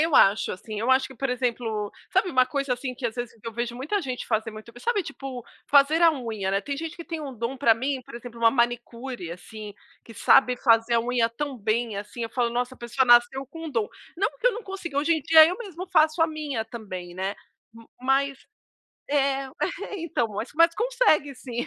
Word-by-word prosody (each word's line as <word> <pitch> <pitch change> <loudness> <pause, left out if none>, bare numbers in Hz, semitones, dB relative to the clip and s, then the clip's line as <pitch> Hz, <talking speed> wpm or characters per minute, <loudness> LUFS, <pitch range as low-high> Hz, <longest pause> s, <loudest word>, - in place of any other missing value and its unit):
eu 325 -3 +2
acho 200 +2 +5
assim, 210 +3 -6
eu 235 +4 +1
acho 260 0 +4
que 265 - -13
por 270 +2 -2
exemplo, 230 -4 -2 0.2
sabe 375 0 +2
uma 255 -3 +4
coisa 275 0 -2
assim 255 +1 -3
que 250 - -2
às 225 - -4
vezes 240 -1 -4
eu 230 - -5
vejo 235 +1 -3
muita 315 +10 -1
gente 255 -4 -4
fazer 220 -1 0
muito 215 +2 -11
bem, 240 - -13
sabe 420 -7 0
tipo, 270 -3 -7 0.2
fazer 290 +4 +5
a 335 - +8
unha, 225 -9 -3
né. 195 +1 +1
Tem 280 +6 -4
gente 325 +1 -5
que 335 - -8
tem 330 -3 -5
um 280 -3 -6
dom 235 +3 -4
para 250 -4 +5
mim, 260 +3 -2
exemplo 235 0 -9
uma 230 -1 +6
manicure 240 -4 -2
assim, 205 +4 -9 0.3
que 230 - -12
sabe 250 +3 +4
fazer 230 -1 +3
a 230 - +4
unha 240 -1 +1
tão 270 +4 -4
bem 220 0 -1
assim, 210 +3 -5
falo: 235 0 0
"Nossa, 245 +2 -2
a - - -22
pessoa 240 +3 0
nasceu 240 +3 +5
com 325 +4 -8
um 310 - -5
dom". 225 -5 0 0.3
Não 395 +4 +2
porque - - +2
eu - - 0
não 460 +1 -7
consigo, 365 -7 -4
hoje 305 +3 +2
em 315 -2 0
dia 315 +1 +8
eu 360 +3 -1
mesmo 375 -6 -7
faço 315 -2 +3
a 325 - +6
minha 295 -7 -3
também, 185 -6 -8
né. 190 +2 -3 0.6
Mas 270 +2 +1 0.7
é, 275 -1 +1 0.5
então, 295 -8 -1 0.3
mas 335 +1 +5
consegue 460 - +2
sim. 245 -1 -5
255 Hz, 215 wpm, -25 LUFS, 230-295 Hz, 0.7 s, a